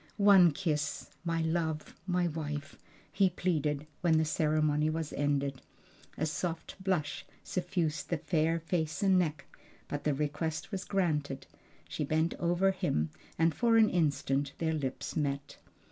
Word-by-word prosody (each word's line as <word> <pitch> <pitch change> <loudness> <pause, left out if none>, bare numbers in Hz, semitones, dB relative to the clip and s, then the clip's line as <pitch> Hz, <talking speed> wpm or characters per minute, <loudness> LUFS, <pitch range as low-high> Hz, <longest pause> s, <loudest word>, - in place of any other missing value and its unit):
"One 200 -4 +7
kiss, 150 -3 -2
my 165 -1 0
love, 160 -1 -1
my 180 -1 +2
wife!" 150 -2 -4 0.4
he 195 -1 +3
pleaded 155 -5 -1 0.2
when 165 -2 +4
the 160 - +3
ceremony 155 -1 +2
was 160 -1 -3
ended. 140 -2 0 0.6
A 155 - 0
soft 165 +4 -4
blush 175 -6 -1 0.2
suffused 175 -5 -2
the 170 - +1
fair 160 +1 +1
face 165 +2 -2
and 190 -2 +5
neck, 155 -4 -1 0.4
but 145 - -4
the 150 -2 +1
request 150 +4 -2
was 195 -1 -3
granted; 150 -8 -1 0.4
she - - -3
bent 160 +3 +1
over 175 +3 +3
him 80 - -1 0.3
and 165 0 +3
for 230 +8 +3
an 220 -1 +5
instant 145 -4 +1
their 160 -1 0
lips 145 -1 -3
met. 140 -1 -2
160 Hz, 145 wpm, -31 LUFS, 150-175 Hz, 0.6 s, One